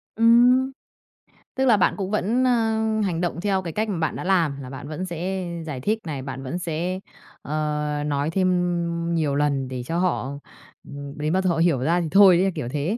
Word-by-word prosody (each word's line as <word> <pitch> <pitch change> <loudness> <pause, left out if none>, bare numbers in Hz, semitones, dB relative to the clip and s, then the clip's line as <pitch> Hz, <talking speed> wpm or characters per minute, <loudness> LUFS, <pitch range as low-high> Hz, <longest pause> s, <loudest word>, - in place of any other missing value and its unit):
Ừm. 245 +4 +5 0.8
Tức 265 0 +1
là 225 -5 +5
bạn 180 - +3
cũng 195 0 -3
vẫn, 220 +5 +1
a, 250 - +4 0.5
hành 170 -2 -1
động 175 0 -2
theo 195 -1 +1
cái 170 -3 -6
cách 215 0 -1
mà 190 - -2
bạn 160 -1 -1
đã - - -5
làm, 165 -7 +1
là 130 - -8
bạn 140 +2 -8
vẫn 155 +5 -4
sẽ 180 +2 -3 0.2
giải 135 -5 -5
thích 215 +8 0
này, 140 -4 -4
bạn 135 0 -6
vẫn 130 +7 -4
sẽ, 175 +2 -3 0.4
ờ, 150 0 -2
nói 145 0 -1
thêm 175 -2 0
nhiều 150 -4 0
lần 140 -2 0
để 125 -1 -5
cho 165 +6 -2
họ 180 -7 0 0.6
ừm, 140 0 -8
đến 155 +3 -1
bao 190 - +2
giờ 185 - +1
họ 170 - 0
hiểu 165 -5 +3
ra 170 +7 +1
thì 165 - -2
thôi 195 -3 +7
đấy, 190 +1 +2
kiểu 120 - -4
thế, 150 +9 -1
170 Hz, 215 wpm, -23 LUFS, 150-190 Hz, 0.8 s, thôi